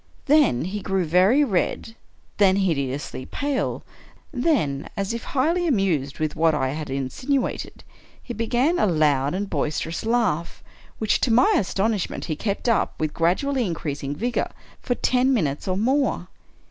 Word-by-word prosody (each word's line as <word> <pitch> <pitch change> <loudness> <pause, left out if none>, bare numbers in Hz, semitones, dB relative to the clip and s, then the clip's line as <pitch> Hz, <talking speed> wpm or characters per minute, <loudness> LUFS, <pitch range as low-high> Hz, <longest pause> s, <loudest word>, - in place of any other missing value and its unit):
Then 280 - +3
he 205 +3 -4
grew 190 -2 0
very 185 - +4
red 225 0 -1 0.2
— - - -36
then 195 -2 +5
hideously 140 -8 -2
pale 285 -2 -2 0.3
— - - -25 0.2
then, 245 - 0
as 195 +2 -1
if 235 - -5
highly 330 +6 +1
anmsed 170 - 0
with 155 -1 -1
what 160 -1 +3
I 130 -3 0
had 150 +2 -5
insinuated, 245 - -2 0.4
he 240 - -7
began 245 +9 +1
a - - +3
loud 150 -3 +2
and 200 +2 -2
boisterous 160 -1 -2
laugh, 220 -8 0 0.3
which, 220 - +1
to 245 - +1
my 390 - +5
astonishment, 205 - -1
he 155 - -2
kept 200 +7 -3
up, 230 - +1
with 155 -1 -1
gradually 250 +11 +1
increasing 145 -6 -3
vigor, 240 +8 -1 0.3
for 245 - -1
ten 255 +2 +2
minutes 150 - -1
or 185 0 0
more. 240 -5 0
195 Hz, 155 wpm, -23 LUFS, 155-245 Hz, 0.4 s, then